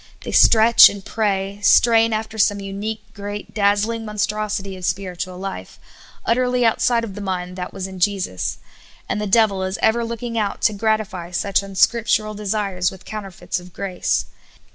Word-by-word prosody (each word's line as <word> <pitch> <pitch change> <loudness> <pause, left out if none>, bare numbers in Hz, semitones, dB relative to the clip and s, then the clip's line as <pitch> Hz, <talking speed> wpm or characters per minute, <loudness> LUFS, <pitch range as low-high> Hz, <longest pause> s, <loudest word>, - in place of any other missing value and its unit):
They - - -6
stretch 225 +1 +7
and 200 -1 -9
pra}^; 200 -2 -2
strain 225 +1 +5
after 220 0 -3
some 205 0 +3
unique, 205 +2 -5
great, 205 0 -7
dazzhng 210 +2 +1
monstrosity 210 -2 -2
of 185 - -11
spiritual 180 0 -3
life, 185 - -7 0.5
utterly 250 +1 +1
outside 230 +1 +2
of 215 -4 -6
the 205 - -7
mind 180 -2 -4
that 180 -1 -5
was 190 -2 -5
in 190 -1 -8
Jesus; 185 - -1 0.5
and 210 - -2
the 210 - -2
devil 200 -2 +3
is 190 0 -2
ever 235 +2 +2
looking 230 0 -4
out 205 -2 -2
to 215 - +3
gratify 205 -4 -1
such 195 +3 0
unscriptural 215 +2 +1
desires 200 -3 -1
with 190 -2 -13
counterfeits 195 -4 -5
of 180 0 -14
grace. 190 -3 -1
205 Hz, 160 wpm, -21 LUFS, 190-220 Hz, 0.5 s, stretch